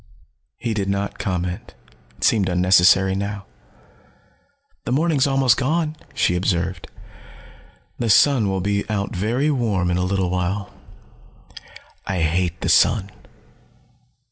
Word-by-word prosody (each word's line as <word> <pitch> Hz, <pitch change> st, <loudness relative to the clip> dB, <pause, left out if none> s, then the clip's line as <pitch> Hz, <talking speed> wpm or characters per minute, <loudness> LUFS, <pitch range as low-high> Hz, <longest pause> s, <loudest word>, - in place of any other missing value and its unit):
He 115 Hz, -2 st, -3 dB
did 100 Hz, -2 st, -2 dB
not 100 Hz, +1 st, -3 dB
comment. 90 Hz, -6 st, -4 dB, 0.4 s
It -, -, -8 dB
seemed 100 Hz, -4 st, +2 dB
unnecessary 90 Hz, +1 st, +4 dB
now. 100 Hz, 0 st, -4 dB, 1.4 s
"The -, -, -3 dB
morning's 145 Hz, 0 st, +2 dB
almost 135 Hz, -3 st, +3 dB
gone," 155 Hz, +3 st, -1 dB, 0.2 s
she 90 Hz, -, +1 dB
observed. 90 Hz, -1 st, -2 dB, 1.1 s
"The 115 Hz, -, -1 dB
sun 120 Hz, -2 st, +4 dB
will 95 Hz, -1 st, -1 dB
be 100 Hz, +1 st, -1 dB
out 100 Hz, -2 st, -2 dB
very 120 Hz, +11 st, 0 dB
warm 105 Hz, -10 st, 0 dB
in 90 Hz, -, 0 dB
a 90 Hz, -, 0 dB
little 95 Hz, -1 st, -1 dB
while. 95 Hz, +3 st, -3 dB, 1.3 s
I 95 Hz, -3 st, -2 dB
hate 85 Hz, +2 st, -1 dB
the -, -, -2 dB
sun." 105 Hz, -3 st, +3 dB
100 Hz, 120 wpm, -21 LUFS, 90-115 Hz, 1.4 s, unnecessary